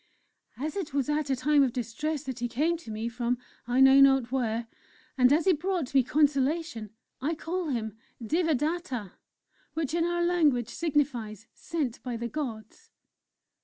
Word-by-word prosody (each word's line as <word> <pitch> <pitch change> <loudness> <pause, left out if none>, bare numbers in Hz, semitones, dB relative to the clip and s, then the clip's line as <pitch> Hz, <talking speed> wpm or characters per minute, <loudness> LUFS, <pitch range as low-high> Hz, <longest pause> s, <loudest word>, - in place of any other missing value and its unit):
"As 300 +6 -4
it 345 -8 -4
was 280 -1 0
at 300 -1 0
a 265 - +2
time 290 +3 +3
of 260 -3 +2
distress 275 +6 -3
that 260 -3 -5
he 240 - -1
came 305 +8 +1
to 290 -9 -12
me, 220 +1 -3
from 240 +1 -1 0.3
I 245 +1 +1
know 265 +1 +8
not 270 -3 +5
where, 235 -3 -1 0.5
and 250 -1 +5
as 315 +4 +3
he 380 - +5
brought 340 -4 -2
me 270 - +6
consolation 280 -2 +1 0.3
I 310 +5 0
call 345 +3 -3
him 220 -6 -3 0.2
'Devadatta,' 300 - -1 0.6
which 315 -3 -2
in 335 0 +2
our 345 0 0
language 300 -10 +2
signifies 255 - -1
'Sent 300 -8 -3
by 245 -2 -4
the 235 +1 -3
Gods.'" 235 -5 -6
275 Hz, 165 wpm, -28 LUFS, 240-315 Hz, 0.6 s, know